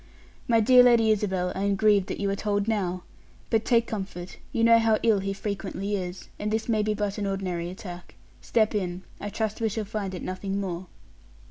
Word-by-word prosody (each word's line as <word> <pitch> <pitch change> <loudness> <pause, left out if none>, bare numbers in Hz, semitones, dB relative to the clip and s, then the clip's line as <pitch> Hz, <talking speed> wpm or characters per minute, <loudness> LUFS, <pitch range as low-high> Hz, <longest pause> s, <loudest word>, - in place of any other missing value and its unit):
"My 230 -2 +4
dear 250 +3 +7
Lady 235 -3 +5
Isabel, 190 -4 0
I 190 - -4
am 200 0 +2
grieved 205 -2 +3
that - - -4
you 200 - 0
are - - 0
told 205 0 -1
now. 185 -5 -1 0.5
But 225 -1 +3
take 235 -1 +3
comfort; 190 -5 -6
you 230 -4 0
know 230 0 +7
how 225 -1 +3
ill 220 -3 +4
he 195 +1 -2
frequently 200 0 -3
is, 180 -1 -5
and 210 - -2
this 220 +1 -1
may 220 -2 +2
be 210 0 0
but 205 0 -2
an 200 - -1
ordinary 180 -3 -2
attack. 180 -1 -9 0.3
Step 220 -2 +2
in. 185 -3 -2 0.2
I 205 - -4
trust 220 +1 -3
we 225 - +2
shall 215 +1 -3
find 200 -2 -4
it - - -6
nothing 195 +1 -3
more." 185 -2 -4
205 Hz, 210 wpm, -26 LUFS, 190-220 Hz, 0.5 s, dear